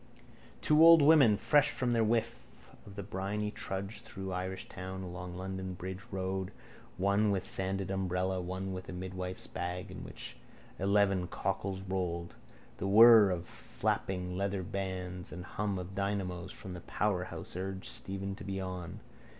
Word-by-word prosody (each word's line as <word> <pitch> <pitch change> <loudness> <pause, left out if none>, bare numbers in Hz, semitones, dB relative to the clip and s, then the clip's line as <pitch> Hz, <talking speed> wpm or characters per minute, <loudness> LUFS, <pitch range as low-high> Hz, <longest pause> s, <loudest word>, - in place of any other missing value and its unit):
Two 155 +1 +5
old 165 -2 +9
women 140 -9 +7
fresh 145 +5 +4
from 125 -3 -1
their 115 -1 +3
whiff 115 +1 -2 0.2
of 100 - -11
the 100 - -4
briny 105 +2 -2
trudged 95 +1 -4
through 95 0 -6
Irishtown 95 0 -5
along 90 0 -6
London 95 0 -4
bridge 95 +2 -6
road, 95 -1 -2 0.5
one 100 +3 +3
with 95 -2 +1
a - - -10
sanded 95 0 -1
tired - - -1
umbrella, 95 0 0
one 95 +2 -4
with 90 0 -7
a - - -5
midwife's 90 0 -4
bag 90 +1 -4
in - - -7
which - - -7 0.4
eleven 100 -1 +3
cockles 95 +1 -2
rolled. 90 -3 -2 0.4
The - - -2
whirr 110 0 +9
of 90 -2 -2
flapping 90 +8 -2
leathern 100 0 -2
bands 90 -2 -4
and 90 +1 -7
hum 100 -2 -2
of 90 +1 -6
dynamos 95 -2 -2
from 95 -1 -8
the 90 - -7
powerhouse 90 -1 -2
urged 95 +1 -4
Stephen 95 0 -3
to - - -8
be 95 -1 -3
on. 90 -2 -5
95 Hz, 160 wpm, -32 LUFS, 90-100 Hz, 0.5 s, old